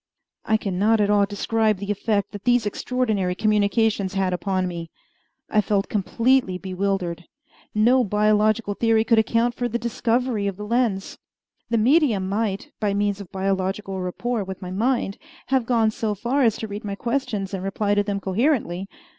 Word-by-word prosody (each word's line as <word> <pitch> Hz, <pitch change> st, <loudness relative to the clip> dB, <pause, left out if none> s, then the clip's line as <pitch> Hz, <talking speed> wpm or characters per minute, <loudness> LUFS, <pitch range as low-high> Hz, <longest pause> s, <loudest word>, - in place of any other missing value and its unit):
I 220 Hz, -, +3 dB
can 195 Hz, -4 st, -3 dB
not 220 Hz, +2 st, +3 dB
at 205 Hz, 0 st, +2 dB
all 205 Hz, -1 st, +4 dB
describe 215 Hz, +1 st, 0 dB
the 200 Hz, +2 st, -3 dB
effect 205 Hz, 0 st, -1 dB
that 205 Hz, -1 st, -8 dB
these 245 Hz, -2 st, +3 dB
extraordinary 210 Hz, -4 st, -1 dB
communications 210 Hz, -1 st, +1 dB
had 190 Hz, -1 st, +1 dB
upon 185 Hz, 0 st, -1 dB
me. 170 Hz, -2 st, -6 dB, 0.6 s
I 215 Hz, -, +3 dB
felt 200 Hz, -1 st, 0 dB
completely 230 Hz, 0 st, +1 dB
bewildered. 185 Hz, -2 st, -2 dB, 0.5 s
No 245 Hz, +4 st, +4 dB
biological 210 Hz, +1 st, +2 dB
theory 225 Hz, +1 st, +2 dB
could 225 Hz, 0 st, +4 dB
account 230 Hz, +2 st, +1 dB
for 245 Hz, 0 st, -2 dB
the 235 Hz, -, -1 dB
discovery 235 Hz, -1 st, 0 dB
of 195 Hz, -2 st, -3 dB
the 210 Hz, -, -6 dB
lens. 225 Hz, -4 st, -1 dB, 0.5 s
The 230 Hz, -, +2 dB
medium 235 Hz, -, +3 dB
might, 200 Hz, 0 st, -2 dB
by 205 Hz, -2 st, 0 dB
means 205 Hz, 0 st, 0 dB
of 190 Hz, -, -11 dB
biological 190 Hz, 0 st, -2 dB
rapport 220 Hz, +5 st, -2 dB
with 190 Hz, 0 st, -7 dB
my 180 Hz, -1 st, -7 dB
mind, 225 Hz, 0 st, 0 dB, 0.3 s
have 260 Hz, -3 st, +1 dB
gone 225 Hz, -3 st, +3 dB
so 215 Hz, -1 st, -2 dB
far 245 Hz, +7 st, 0 dB
as 225 Hz, -4 st, +3 dB
to 220 Hz, -, -5 dB
read 205 Hz, 0 st, -6 dB
my 200 Hz, -1 st, -4 dB
questions 235 Hz, -4 st, -2 dB
and 190 Hz, -1 st, -3 dB
reply 200 Hz, +1 st, 0 dB
to 205 Hz, -, +3 dB
them 205 Hz, -1 st, -2 dB
coherently. 195 Hz, -, 0 dB
210 Hz, 170 wpm, -23 LUFS, 195-230 Hz, 0.6 s, all